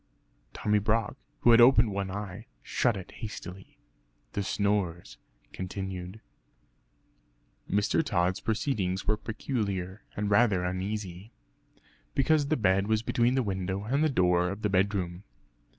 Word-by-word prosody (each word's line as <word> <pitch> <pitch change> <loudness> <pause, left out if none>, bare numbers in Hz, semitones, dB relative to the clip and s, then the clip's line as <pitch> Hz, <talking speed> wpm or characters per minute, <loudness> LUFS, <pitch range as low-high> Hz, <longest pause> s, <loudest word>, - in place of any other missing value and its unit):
Tommy 105 0 +1
Brock, 110 +3 0 0.3
who 120 - +6
had 115 0 +8
opened 120 -3 +6
one 100 -1 -2
eye 100 +2 -6 0.2
shut 120 -5 +1
it 95 - -9
hastily. 95 -4 -8 0.6
The 100 - -1
snores 95 - -1 0.3
continued. 95 +1 -5 1.5
Mr. 105 +10 +2
Tod's 90 - 0
proceedings 105 -5 -1
were 110 - +2
peculiar, 105 -4 -3 0.2
and 105 0 -1
rather 100 -4 +4
uneasy, 95 +2 -4 0.8
(because 145 +1 +3
the 155 +2 +1
bed 95 -2 +2
was 110 0 +1
between 120 +2 +2
the 130 - +2
window 95 -1 -2
and 135 +8 +1
the 155 - +3
door 90 -7 +2
of 100 +3 -6
the 105 - +2
bedroom). 95 -2 0
100 Hz, 130 wpm, -29 LUFS, 95-110 Hz, 1.5 s, had